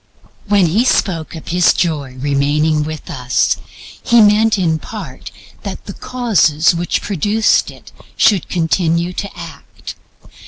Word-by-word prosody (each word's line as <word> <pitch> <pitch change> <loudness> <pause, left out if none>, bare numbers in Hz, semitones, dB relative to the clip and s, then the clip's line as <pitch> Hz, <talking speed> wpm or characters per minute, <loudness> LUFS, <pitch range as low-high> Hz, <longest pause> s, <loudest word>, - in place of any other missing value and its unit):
When 200 -2 +3
He 190 +9 +2
spoke 175 -10 0
of 160 - -9
His 175 0 +3
Joy 145 -7 -2
remaining 145 +3 +1
with 155 0 -6
us 130 -6 0 0.4
He 235 -1 +3
meant 215 +1 +4
in 165 -4 0
part 165 - -9 0.3
that 200 - -7
the 200 - -7
causes 190 -12 +1
which 170 +1 -2
produced 205 +3 +1
it - - -14 0.3
should 200 -6 +2
continue 170 0 0
to 200 +2 -4
act. 170 -2 -10
170 Hz, 130 wpm, -16 LUFS, 155-205 Hz, 0.4 s, meant